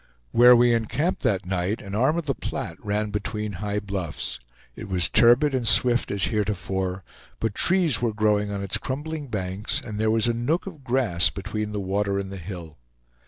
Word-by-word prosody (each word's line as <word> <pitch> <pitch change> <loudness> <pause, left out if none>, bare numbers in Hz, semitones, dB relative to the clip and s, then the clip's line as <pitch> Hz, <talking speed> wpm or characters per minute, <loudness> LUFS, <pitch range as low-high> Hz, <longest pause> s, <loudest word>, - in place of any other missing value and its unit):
Where 125 +1 +7
we 120 0 +4
encamped 140 - -1
that 100 -7 0
night, 95 +3 -2
an 100 -2 -9
arm 130 +10 +2
of 170 - -3
the 135 - 0
Platte - - -6
ran 105 0 -2
between 105 0 -3
high 105 0 -1
bluffs; 85 -11 -4 0.4
it 110 - -8
was 90 -3 +2
turbid 125 +5 +4
and 125 -3 -1
swift 120 +2 +4
as 100 -1 -1
heretofore, 95 -3 -2 0.4
but 115 -2 -1
trees 175 - +3
were 120 -2 +1
growing 105 -1 +1
on 100 -1 -4
its 100 +1 -1
crumbling 145 +4 -5
banks, 95 -2 -3
and 105 -3 -7
there 110 0 +1
was 110 +1 +2
a 120 - +1
nook 125 +9 -1
of 165 -8 -10
grass 120 -9 +3
between 105 +2 -5
the 105 - -3
water 100 +1 -1
and 95 -1 -4
the 100 - -6
hill. 85 -5 -9
105 Hz, 190 wpm, -24 LUFS, 100-120 Hz, 0.4 s, Where